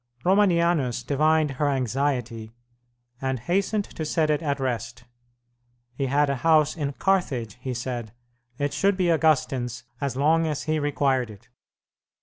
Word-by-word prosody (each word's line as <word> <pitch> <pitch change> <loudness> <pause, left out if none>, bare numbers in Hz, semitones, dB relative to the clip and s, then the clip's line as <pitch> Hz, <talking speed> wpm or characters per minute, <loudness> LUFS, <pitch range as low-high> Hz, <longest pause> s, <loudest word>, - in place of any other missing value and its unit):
Romanianus 170 - +2
divined 155 +3 +2
her 145 +2 0
anxiety, 125 -4 -1 0.7
and 130 -1 -1
hastened 195 - 0
to 160 - -7
set 155 0 +1
it 150 - 0
at 145 -3 -1
rest. 120 -2 -3 0.9
He 135 +2 -2
had 145 +2 +2
a 140 -1 -1
house 155 +2 +3
in 145 -4 -3
Carthage, 135 - -1
he 130 -1 -4
said; 120 -2 -4 0.5
it 145 0 -1
should 200 -1 +2
be 180 -2 +2
Augustine's 135 -7 +1 0.2
as 140 -3 -2
long 160 +4 +3
as 150 -2 -2
he 155 0 0
required 140 -4 0
it. 105 +2 -14
140 Hz, 140 wpm, -25 LUFS, 125-160 Hz, 0.9 s, house